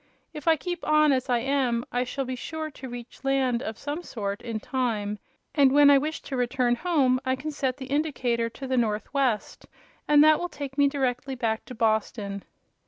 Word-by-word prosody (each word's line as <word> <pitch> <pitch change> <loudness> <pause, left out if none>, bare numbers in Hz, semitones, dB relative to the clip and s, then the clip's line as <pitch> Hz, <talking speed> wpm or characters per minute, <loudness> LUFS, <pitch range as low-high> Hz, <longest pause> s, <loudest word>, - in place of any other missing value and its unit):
If 300 +1 -9
I 325 - +6
keep 350 +4 -5
on 305 -1 +4
as 260 -1 0
I 245 - +3
am 255 -3 0
I 245 0 +1
shall 270 +2 -3
be 255 0 -3
sure 315 +4 -5
to 265 -2 -9
reach 240 +2 -9
land 265 -3 +1
of 220 -3 -5
some 295 +4 -4
sort, 200 -10 -4
in 230 -2 -4
time, 215 -4 -2 0.3
and 280 -2 +5
when 285 +1 +7
I 280 - +7
wish 310 +3 -4
to 270 - -5
return 250 0 +1
home 270 -6 +2
I 260 -1 +1
can 295 +4 -5
set 265 -3 -2
the 265 - -7
indicator 260 -5 0
to 270 - -9
the 260 -1 -1
northwest 230 +2 -1 0.4
and 295 0 +7
that 310 0 +6
will 355 - -3
take 280 -3 -7
me 285 0 +4
directly 265 -1 -1
back 225 -3 -2
to 250 - -9
Boston." 215 -3 0
260 Hz, 200 wpm, -26 LUFS, 240-285 Hz, 0.4 s, when